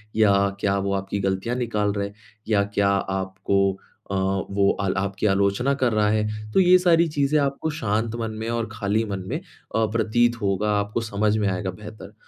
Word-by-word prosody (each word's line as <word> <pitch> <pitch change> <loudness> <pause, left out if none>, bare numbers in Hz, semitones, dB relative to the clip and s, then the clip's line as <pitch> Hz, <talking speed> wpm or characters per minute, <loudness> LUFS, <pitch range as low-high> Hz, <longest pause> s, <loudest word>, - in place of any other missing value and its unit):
या 100 -2 +4
क्या 100 -1 +1
वो 100 0 -1
आपकी 95 +1 -2
ग़लतियाँ 95 +5 -1
निकाल 105 -5 -1
रहे 100 0 -3 0.4
या 105 -2 +3
क्या 100 -1 +2
आपको 95 0 -1 0.5
अ, - - -1
वो 95 +1 +1
अल 95 -1 0
आपकी 100 +2 -2
आलोचना 100 +7 +2
कर 125 -4 +1
रहा 105 -1 +2
है? 105 0 -2
तो - - +4
ये 185 -1 +7
सारी 170 -2 +4
चीज़ें 150 -1 +1
आपको 140 +2 -1
शांत 115 -6 -1
मन 115 -1 -2
में 115 - -3
और 115 -1 -2
खाली 110 0 0
मन 100 -3 -4
में 145 - -1
अ, 140 - -4
प्रतीत 120 +2 +2
होगा, 100 +1 0
आपको 105 +3 -2
समझ 105 -1 0
में 105 -2 +1
आएगा 95 0 -2
बेहतर। 105 +3 -11
105 Hz, 185 wpm, -24 LUFS, 100-115 Hz, 0.5 s, ये